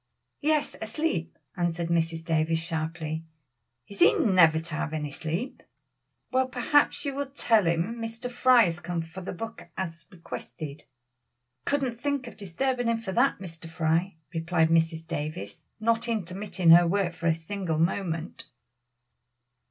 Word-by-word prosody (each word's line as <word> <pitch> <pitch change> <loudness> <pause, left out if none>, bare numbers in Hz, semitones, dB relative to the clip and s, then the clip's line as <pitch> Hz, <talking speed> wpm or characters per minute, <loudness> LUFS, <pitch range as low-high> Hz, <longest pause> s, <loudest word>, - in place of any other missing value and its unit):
"Yes, 305 0 +1
asleep," 220 - -2 0.2
answered 170 -1 -1
Mrs. 165 -1 0
Davies 160 0 +2
sharply; 160 -1 -3 0.6
"is 200 - -10
he - - +7
never 175 -7 +5
to 165 0 -7
have 155 0 -2
any 150 -2 -3
sleep?" 170 - -4 0.7
"Well, 260 0 +2
perhaps 260 +5 +2
you 280 - -1
will 280 +1 -2
tell 225 -8 +2
him 170 +8 0
Mr. 230 +2 -5
Fry 245 -1 +6
has 175 -3 -1
come 175 -1 -3
for 165 +3 -9
the 185 - -5
book 225 0 -7
as 170 -3 -5
requested." 160 -4 -8 0.8
"Couldn't 260 -5 -1
think 285 -2 -1
of 235 - -9
disturbing 245 +6 -1
him 230 0 +2
for 215 -4 -5
that, 245 +7 +3
Mr. 165 -3 -9
Fry," 165 +2 0 0.2
replied 165 0 +2
Mrs. 165 0 +2
Davies, 150 - -5 0.2
not 230 +1 +1
intermitting 190 -4 +1
her 170 +1 +8
work 185 -1 +1
for 170 - -3
a 160 - +4
single 165 0 -3
moment. 165 0 -1
175 Hz, 145 wpm, -27 LUFS, 165-230 Hz, 0.8 s, her